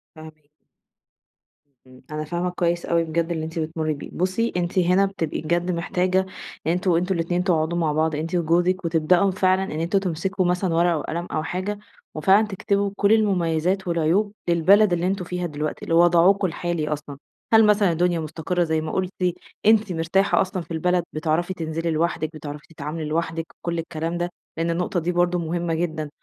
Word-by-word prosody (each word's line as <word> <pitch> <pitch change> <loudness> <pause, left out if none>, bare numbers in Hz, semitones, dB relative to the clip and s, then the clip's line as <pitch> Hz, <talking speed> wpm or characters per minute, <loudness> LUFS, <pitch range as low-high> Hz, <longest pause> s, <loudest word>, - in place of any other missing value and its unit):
فاهماكِ. 155 -2 -13 1.4
إمم. 130 0 -16
أنا 155 0 -3
فاهمة 175 +3 -2
كويس 175 -1 -1
أوي 170 0 +2
بجد 165 +1 -1
اللي 160 -2 -2
أنتِ 160 +1 -5
بتمُرّي 155 -1 -2
بيه. 145 - -8
بُصّي، 185 +6 0
أنتِ 180 +2 0
هنا 185 +2 +4
بتبقي 180 -5 -3
بجد 170 +3 0
محتاجة 180 +1 0 0.5
يعني 165 +2 +2
أنتم 180 +1 0
أنتم 180 +3 +1
الاتنين 175 +2 0
تقعدوا 170 -2 +1
مع 160 -3 +1
بعض 155 +1 +1
أنتِ 160 +4 -3
وجوزِك 175 +2 +1
وتبدأوا 170 +4 +3
فعلًا 185 0 +2
إن 195 - -5
أنتم 170 +4 +1
تمسكوا 185 +1 -1
مثلًا 180 0 0
ورقة 170 0 +3
وقلم 170 +3 -4
أو 155 - -1
حاجة 190 +4 -3 0.4
وفعلًا 195 +8 +4
تكتبوا 200 0 -1
كل 200 +1 +3
المميزات 185 -3 +1
والعيوب 170 +5 +1 0.2
للبلد 185 +4 +5
اللي 175 +1 0
أنتم 190 -1 -1
فيها 180 0 -3
دلوقتي، 150 -2 -4
لوضعكم 175 +3 +4
الحالي 170 -2 -2
أصلًا. 150 -2 -5 0.4
هل 220 -1 +7
مثلًا 205 -3 +4
الدنيا 175 +1 +1
مُستقرة 160 +3 -2
زي 160 -1 0
ما 155 - -4
قُلتِ؟ 185 -1 -1 0.5
أنتِ 215 -3 +4
مرتاحة 170 +5 +2
أصلًا 185 -1 -2
في 165 - -17
البلد، 175 +2 +1
بتعرفي 160 +4 0
تنزلي 165 0 -3
لوحدِك، 160 0 0
بتعرفي 150 -1 -8
تتعاملي 155 +1 -5
لوحدِك، 165 +1 -2 0.2
كل 170 -1 -1
الكلام 165 +1 -3
ده، 175 0 -1 0.3
لإن 165 +1 0
النقطة 180 +2 -1
دي 170 +2 -1
برضه 175 0 +1
مهمة 170 0 -2
جدًا. 160 -2 -2
170 Hz, 175 wpm, -23 LUFS, 160-185 Hz, 1.4 s, هل